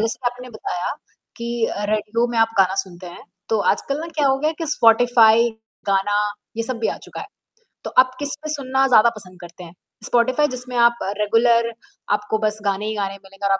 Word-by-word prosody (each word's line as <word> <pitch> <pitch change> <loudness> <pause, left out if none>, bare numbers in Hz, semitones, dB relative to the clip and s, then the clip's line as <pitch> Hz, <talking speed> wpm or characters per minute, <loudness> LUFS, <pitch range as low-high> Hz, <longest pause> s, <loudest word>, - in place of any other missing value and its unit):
जैसे 225 +1 -1
आपने 250 +1 -4
बताया 180 -5 -4 0.4
कि 235 -1 -2
अ, 205 - -4
रेडियो 215 +2 0
में 235 - -1
आप 225 0 +4
गाना 190 -1 +4
सुनते 180 -1 -12
हैं, 175 - -10 0.3
तो 220 - +1
आजकल 275 +1 -3
ना 330 - -5
क्या 290 -2 +2
हो 270 0 +2
गया 305 +3 +1
है 315 - -2
कि 330 - -3
स्पॉटिफ़ाई, 235 -3 +5 0.4
गाना, 200 +1 +1 0.4
ये 230 - -1
सब 240 +1 -3
भी 225 - 0
आ - - -2
चुका - - -9
है। - - -7 0.6
तो - - -4
आप 255 0 +5
किसमें 295 +1 -5
सुनना 270 -2 +1
ज़्यादा 235 -2 +6
पसंद 185 -3 -8
करते 175 +1 -11
हैं? 170 -1 -12 0.3
स्पॉटिफाई 255 +5 +2
जिसमें 250 -1 -6
आप 235 0 +4 0.2
रेगुलर 230 +2 +3 0.4
आपको 210 +1 -1
बस 215 0 +1
गाने 200 +1 0
ही 220 - -3
गाने 195 -1 -2
मिलेंगे 195 +1 -9
और - - +1
आप 195 - +2
230 Hz, 210 wpm, -21 LUFS, 205-250 Hz, 0.6 s, ज़्यादा